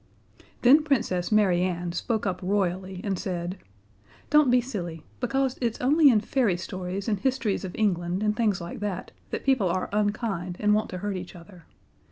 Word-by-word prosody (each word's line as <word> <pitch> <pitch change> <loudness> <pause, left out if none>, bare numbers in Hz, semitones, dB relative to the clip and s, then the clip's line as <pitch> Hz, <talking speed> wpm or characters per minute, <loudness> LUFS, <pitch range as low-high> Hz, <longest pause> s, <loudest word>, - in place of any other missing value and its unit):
Then 280 +5 +7
Princess 215 - 0
Mary 195 -5 +4
Ann 175 -1 -1
spoke 220 +5 -2
up 185 -2 -1
royally, 185 -1 -1
and 195 -3 -2
said, 180 -1 -4 0.7
"Don't 300 -3 +6
be 250 +1 +5
silly, 175 - -5
because 265 +1 0
it's 235 -2 -1
only 290 +4 +5
in 220 -5 +4
fairy 220 -5 +1
stories 185 +1 -5
and 210 -3 0
histories 255 -5 0
of 185 -2 -6
England 180 -2 0
and 210 0 +1
things 210 -4 +1
like 170 0 -7
that, 200 -3 -4 0.2
that - - -4
people 255 -9 +3
are 185 +2 -1
unkind 205 -4 -1
and 210 0 +3
want 215 +1 +1
to 185 - -5
hurt 200 -2 -1
each 180 +1 -8
other. 175 -1 -14
200 Hz, 180 wpm, -26 LUFS, 180-230 Hz, 0.7 s, Then